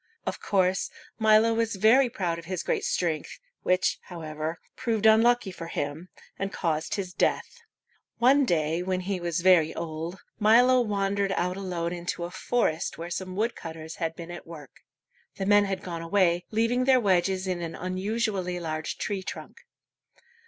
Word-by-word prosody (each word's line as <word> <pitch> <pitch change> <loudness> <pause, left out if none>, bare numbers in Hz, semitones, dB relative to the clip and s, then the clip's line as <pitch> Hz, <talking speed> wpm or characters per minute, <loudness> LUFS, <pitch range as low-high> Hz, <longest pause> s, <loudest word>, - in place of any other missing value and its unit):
Of - - -3
course, 190 -1 +1 0.3
Milo 220 +1 +5
was 230 -1 0
very 240 +6 +5
proud 180 -8 -2
of 165 - -11
his 185 0 -3
great - - -1
strength, 165 -4 -1 0.2
which, 185 +1 +1
however, 160 -1 -5 0.2
proved 225 -4 -1
unlucky 220 -1 +5
for 170 -2 -8
him, 150 +3 -4 0.3
and 195 0 -2
caused 160 -4 -1
his 185 -3 -4
death. 480 - 0 0.6
One 265 +4 +5
day 165 - +1
when 185 0 -1
he 190 0 -2
was 170 0 -2
very 175 -4 +4
old, 165 +2 -5 0.2
Milo 245 +4 +6
wandered 200 -2 0
out 180 0 -1
alone 180 -3 -3
into 175 0 -4
a 175 - -5
forest 180 -6 -1
where 170 +1 -6
some 185 +1 -4
woodcutters 165 -7 -4
had 165 -1 -2
been 170 +1 -8
at 175 - -9
work. 150 -5 -10 0.6
The 195 - -3
men 205 +1 +5
had 195 -1 -3
gone 170 -2 -5
away, 175 0 +2
leaving 230 +3 +1
their 260 -1 +5
wedges 190 -2 +1
in 180 -2 -2
an 165 -1 -5
unusually 185 0 -2
large 155 -2 -4
tree 200 -2 -2
trunk. 185 - -8
185 Hz, 160 wpm, -27 LUFS, 170-215 Hz, 0.6 s, Milo